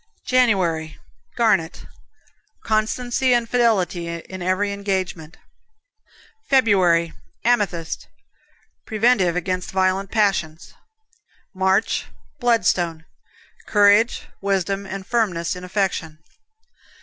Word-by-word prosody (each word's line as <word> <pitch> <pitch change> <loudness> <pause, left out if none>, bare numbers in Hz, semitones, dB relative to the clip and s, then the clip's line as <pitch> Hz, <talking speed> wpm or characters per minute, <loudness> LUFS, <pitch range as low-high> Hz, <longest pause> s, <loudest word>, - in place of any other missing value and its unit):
January, 185 -11 +1 0.4
Garnet. 190 -8 +1 0.8
Constancy 245 +4 +1
and 235 -1 0
fidelity 210 -8 +1
in 170 +2 -7
every 185 +3 0
engagement. 190 -5 -3 1.1
February, 185 -10 +3 0.3
Amethyst 200 -9 0 0.8
Preventive 215 -6 +2
against 180 +1 -2
violent 190 +1 0
passions. 195 -8 -1 0.8
March, 190 +2 +1 0.3
Bloodstone 180 -9 +1 0.6
Courage, 205 +2 +4 0.2
wisdom 195 0 -1
and 195 0 -6
firmness 190 -7 -1
in 180 - -9
affection. 180 -4 -2
195 Hz, 80 wpm, -21 LUFS, 175-220 Hz, 1.1 s, Courage